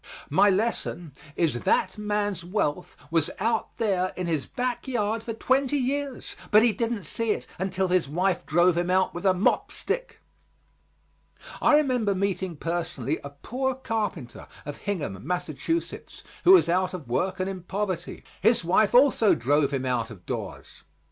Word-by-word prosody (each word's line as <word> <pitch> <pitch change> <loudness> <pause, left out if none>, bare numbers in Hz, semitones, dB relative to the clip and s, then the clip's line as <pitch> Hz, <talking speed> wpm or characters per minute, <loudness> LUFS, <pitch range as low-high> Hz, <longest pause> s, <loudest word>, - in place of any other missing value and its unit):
My 205 - +5
lesson 190 - -1 0.2
is 150 -8 +1
that - - +1
man's 205 -3 -2
wealth 175 -5 -2
was 165 -2 +2
out 225 +2 -1
there 185 -4 0
in 185 - -2
his 160 -5 -1
back 250 +1 -3
yard 225 -3 -1
for 230 0 -5
twenty 265 +4 +1
years, 275 +1 -3
but 215 +1 +6
he 235 -2 +4
didn't 230 -1 -2
see 225 +8 -3
it - - -7
until 190 0 -1
his 180 -6 +2
wife 180 +3 0
drove 175 +3 +3
him 175 +1 -1
out 185 +1 +2
with 175 +3 -2
a 190 - +5
mop 185 - +1
stick. - - -4 1.4
I 300 - +5
remember 250 -9 +2
meeting 190 -2 -1
personally 160 -4 -2
a 140 - -6
poor 255 - -3
carpenter 215 - -4 0.2
of 145 0 -6
Hingham, 150 - -3
Massachusetts, 180 - -3 0.2
who 370 - +9
was 375 - +6
out 185 +1 +1
of 160 -8 -8
work 180 +10 -1
and 185 - -1
in 190 -1 -5
poverty. 185 -1 -4 0.2
His 230 -5 +4
wife 200 +6 +3
also 250 -5 +5
drove 140 +4 +2
him 135 -2 -2
out 120 -3 -1
of 95 -6 -12
doors. - - -6
190 Hz, 160 wpm, -26 LUFS, 165-225 Hz, 1.4 s, who